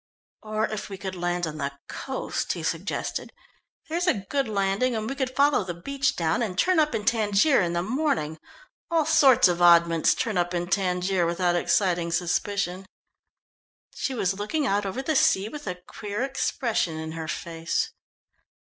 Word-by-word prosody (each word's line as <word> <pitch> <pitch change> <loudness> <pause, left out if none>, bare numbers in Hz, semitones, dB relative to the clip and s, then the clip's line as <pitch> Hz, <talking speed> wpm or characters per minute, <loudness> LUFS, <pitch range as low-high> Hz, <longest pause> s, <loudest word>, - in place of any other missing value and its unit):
"Or 215 0 -1
if 215 -2 -5
we 195 - -6
could 190 -1 -5
land 175 0 -1
on 155 -1 -6
the 140 -1 -2
coast," 265 -1 -3
he - - -6
suggested. - - -3 0.6
"There's 340 +3 -1
a - - +4 0.2
good 275 -3 +1
landing, 205 +4 0
and 220 0 -2
we 270 - -2
could 265 -2 -3
follow 280 -5 +3
the 175 -2 -5
beach 280 +11 -1
down, 165 +4 0
and 195 -6 -2
turn 365 - +3
up 300 -5 +2
in 210 -2 -3
Tangier 215 +4 +3
in 170 -1 -1
the 170 0 0
morning 190 - -1 0.5
all 330 -2 +2
sorts 280 -7 +6
of 175 -1 -1
oddments 170 -1 +5
turn 220 -7 -1
up 175 +1 -1
in 175 0 -2
Tangier 180 -2 +1
without 175 +1 +1
exciting 175 -1 +1
suspicion." 185 +2 -1 1.1
She 265 - -3
was 190 -5 0
looking 290 +9 -1
out 205 -3 +1
over 250 +8 -4
the 310 +2 0
sea 200 -5 +3
with 295 -2 -9
a 180 - -2
queer 210 +3 -4
expression 235 -10 -1
in 160 0 -5
her 160 0 -5
face. 165 +1 -2
195 Hz, 170 wpm, -26 LUFS, 175-255 Hz, 1.1 s, sorts